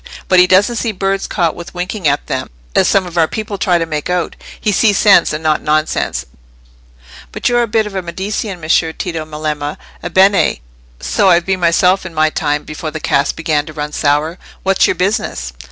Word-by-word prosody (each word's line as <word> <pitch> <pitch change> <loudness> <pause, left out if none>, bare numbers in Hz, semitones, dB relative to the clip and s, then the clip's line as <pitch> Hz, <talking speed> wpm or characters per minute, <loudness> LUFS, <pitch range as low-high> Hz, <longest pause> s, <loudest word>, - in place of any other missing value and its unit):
But 185 - +5
he 180 - +6
doesn't 205 +6 +3
see 225 -1 -1
birds 195 0 -1
caught 170 -5 0
with 175 +1 -10
winking 180 0 -2
at 145 +1 +1
them, 130 -3 -3 0.3
as - - +4
some 195 -2 +2
of 175 -1 -3
our 160 - +4
people 215 0 -5
try 175 0 +2
to 165 - -1
make 150 -1 -4
out. 180 -1 -1 0.2
He 210 - 0
sees 205 0 +3
sense, 205 -2 +5
and 155 +1 -4
not 155 -1 +1
nonsense. 155 +1 0 1.1
But - - -2
you're 240 0 +3
a 235 - 0
bit 220 0 +1
of 210 - -7
a 190 - -2
Medicean, 190 +2 -4
Messer 160 0 +1
Tito 165 -3 -4
Melema. 150 -1 -4 0.3
Ebbene! 190 +3 +3 0.4
so 195 - +2
I've 170 -1 +4
been 190 -1 0
myself 180 +2 +3
in 180 -3 -9
my 155 0 +2
time, 150 -1 -1
before 155 +1 -6
the 155 +1 -6
cask 140 -1 0
began 155 -3 -1
to 155 - -8
run 150 0 -4
sour. 150 +4 0 0.2
What's 195 0 +3
your - - 0
business?" 185 - -2
175 Hz, 200 wpm, -15 LUFS, 155-195 Hz, 1.1 s, he